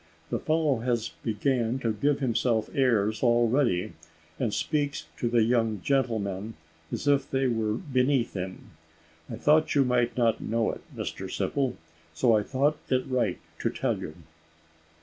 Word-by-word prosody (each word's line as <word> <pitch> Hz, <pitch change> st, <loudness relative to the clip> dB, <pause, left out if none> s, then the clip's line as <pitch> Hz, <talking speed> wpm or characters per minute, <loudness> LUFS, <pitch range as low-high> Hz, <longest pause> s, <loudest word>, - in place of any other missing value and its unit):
The -, -, 0 dB
fellow 155 Hz, -4 st, +1 dB
has 120 Hz, -1 st, -1 dB
began 120 Hz, +2 st, 0 dB
to 115 Hz, -2 st, +1 dB
give 140 Hz, +7 st, 0 dB
himself 115 Hz, -3 st, +1 dB
airs 110 Hz, -5 st, +2 dB
already, 120 Hz, -4 st, +2 dB, 0.5 s
and -, -, 0 dB
speaks 145 Hz, -2 st, -1 dB
to 120 Hz, -, -1 dB
the 115 Hz, -1 st, +4 dB
young 115 Hz, -2 st, +1 dB
gentlemen 110 Hz, -6 st, -1 dB, 0.4 s
as -, -, -4 dB
if 140 Hz, -1 st, +3 dB
they 135 Hz, 0 st, +1 dB
were 110 Hz, -4 st, 0 dB
beneath 130 Hz, -1 st, +1 dB
him. 95 Hz, -1 st, -6 dB, 0.6 s
I -, -, -4 dB
thought 155 Hz, +1 st, +3 dB
you 140 Hz, -2 st, +4 dB
might 125 Hz, -1 st, +1 dB
not 115 Hz, -2 st, +2 dB
know 115 Hz, 0 st, 0 dB
it, -, -, -9 dB, 0.2 s
Mr -, -, -4 dB
Simple, 135 Hz, -3 st, -1 dB, 0.4 s
so 115 Hz, +7 st, +4 dB
I 105 Hz, -, +3 dB
thought 140 Hz, +7 st, +1 dB
it 130 Hz, -1 st, +1 dB
right 125 Hz, -8 st, 0 dB, 0.2 s
to -, -, 0 dB
tell -, -, -1 dB
you." -, -, -7 dB
120 Hz, 150 wpm, -27 LUFS, 110-135 Hz, 0.6 s, the